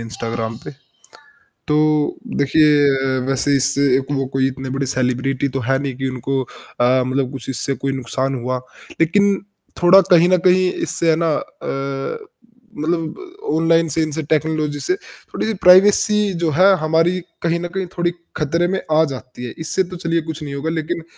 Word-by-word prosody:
Instagram 115 0 -4
पे। - - -6 1.0
तो 150 0 +2 0.2
देखिए 140 -2 +3
वैसे 135 +1 +1
इससे 140 +1 +1 0.2
एक 135 - -3
वो 135 -1 0
कोई 135 0 +2
इतने 135 0 -5
बड़े 135 +1 -2
सेलिब्रिटी 130 +1 -1
तो 135 +1 -3
है 135 +3 +1
नहीं 135 -2 -4
कि 135 0 -2
उनको 130 +1 -2
अ, 125 +1 -1
मतलब 130 0 -1
कुछ 135 -2 -8
इससे 135 +1 -2
कोई 135 - 0
नुकसान 130 +1 -2
हुआ। 125 0 -2 0.4
लेकिन 200 +5 +3 0.5
थोड़ा 185 +3 +7
कहीं 175 0 +6
न 185 - +4
कहीं 185 0 +4
इससे 165 - -1
है 160 - +4
ना 165 - +2
अ, 135 - -5 0.5
मतलब 160 +1 -2 0.4
ऑनलाइन 165 +1 +3
से 160 +3 0
इनसे 155 0 -3
टेक्नोलॉज़ी 155 -1 -1
से, 370 - 0
थोड़ी-सी 225 - -6
प्राइवेसी 205 +2 +5
जो 165 - +2
है 185 - +6 0.2
हमारी 165 +3 +2 0.2
कहीं 170 0 +1
न 175 - -4
कहीं 190 -1 -1
थोड़ी 175 0 +1 0.3
खतरे 165 +4 0
में 190 +1 -1
आ 155 +1 +5
जाती 125 -1 -8
है। 120 - -7
इससे 160 +4 0
तो - - -6
चलिए 170 -1 -1
कुछ 155 0 -8
नहीं 140 -1 -6
होगा 145 +3 -3
लेकिन 165 +1 -3
150 Hz, 170 wpm, -19 LUFS, 135-170 Hz, 1.0 s, थोड़ा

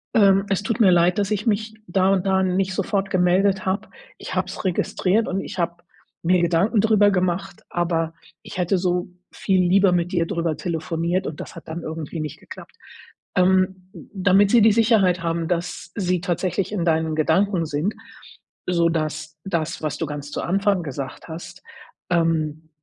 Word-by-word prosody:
Ähm, 195 -2 +5
es 195 0 0
tut 230 +1 -2
mir 200 -5 +6
leid, 175 0 +3
dass 200 -1 0
ich 210 -1 -1
mich 215 +1 0
da 190 +1 +2
und 190 -1 0
da 190 0 +3
nicht 185 0 0
sofort 195 0 -1
gemeldet 185 +1 +2
habe. 195 +3 -2 0.3
Ich - - -7
habe - - 0
es - - -7
registriert 190 +3 +1
und 190 +1 -1
ich 185 - -7
habe 170 +1 -2 0.4
mir 180 +1 +3
Gedanken 175 +6 +2
drüber 210 -2 +4
gemacht, 185 0 -2
aber 165 -2 -1 0.3
ich - - -9
hätte 180 +2 +1
so 180 0 -1 0.2
viel 190 -1 +1
lieber 190 +1 +4
mit 175 +1 0
dir 170 -2 +2
drüber 170 -4 -1
telefoniert. 170 +2 -2
Und 150 - -6
das - - -9
hat 170 - -11
dann 165 +2 -5
irgendwie 160 0 -5
nicht 155 - -6
geklappt.” - - -12 0.6
Ähm, 185 0 +2 0.2
damit 195 +1 +3
sie 235 -2 +6
die 220 - +6
Sicherheit 205 -6 +3
haben, 165 0 -1
dass 175 0 -3
sie 180 -3 0
tatsächlich 180 +2 -1
in 200 -5 -1
deinen 160 -1 +1
Gedanken 170 +3 +2
sind, 155 +7 -1 0.7
so, 170 -2 +2
dass 155 -1 -3
das, 165 -4 -2
was 155 - -2
du 165 - -1
ganz 145 0 -6
zu - - -3
Anfang 195 +1 +1
gesagt 135 -3 -6
hast, 160 +1 -9 0.5
ähm, 160 -2 0
180 Hz, 175 wpm, -22 LUFS, 165-195 Hz, 0.7 s, mir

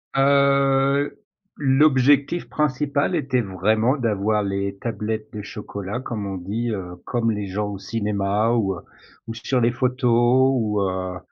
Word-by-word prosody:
Heu, 140 0 +3 0.5
l'objectif 140 +2 +3
principal 145 +2 0
était 135 -6 0
vraiment 110 - +1
d'avoir 105 -3 0
les 100 0 -2
tablettes 110 0 -4
de 105 - -5
chocolat, 100 +2 -6
comme 105 -6 -4
on 95 -1 -4
dit, 105 +7 -3
heu, 90 -3 -5
comme 115 -2 0
les 105 -1 -3
gens 105 +2 -2
au 100 -2 -6
cinéma 105 0 0
ou, 100 -5 +1
heu, - - -9 0.5
ou 115 - -4
sur 125 +3 -1
les 120 0 +3
photos 125 +1 +3
ou, 105 -5 0
heu, 95 -1 -2
115 Hz, 145 wpm, -22 LUFS, 100-135 Hz, 0.5 s, Heu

